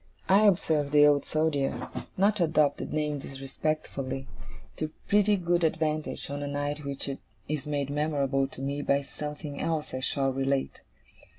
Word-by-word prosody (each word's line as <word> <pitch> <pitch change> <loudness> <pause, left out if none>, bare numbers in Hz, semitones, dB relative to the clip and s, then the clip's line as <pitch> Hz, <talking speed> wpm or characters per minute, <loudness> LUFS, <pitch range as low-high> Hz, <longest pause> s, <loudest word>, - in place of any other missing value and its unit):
I 205 +3 +6
observed 155 -6 +2
the 150 0 +8
Old 145 -1 +4
Soldier 155 -3 0 0.3
not 200 +3 +3
to 175 - +3
adopt 155 -3 +2
the - - -3
name 150 -1 -1
disrespectfully 135 0 -3 0.5
to 155 - -2 0.2
pretty 205 0 +4
good 175 -2 +1
advantage, 155 -1 0
on 145 0 -3
a 145 - -3
night 145 +1 -2
which 140 0 -3 0.4
is 150 -1 -3
made 140 -2 -1
memorable 140 -2 +1
to 135 - -10
me 140 +1 -2
by 140 0 +2
something 150 +1 -6
else 160 -4 -1
I 130 - -2
shall 135 0 0
relate. 135 0 -1
145 Hz, 160 wpm, -28 LUFS, 140-155 Hz, 0.5 s, the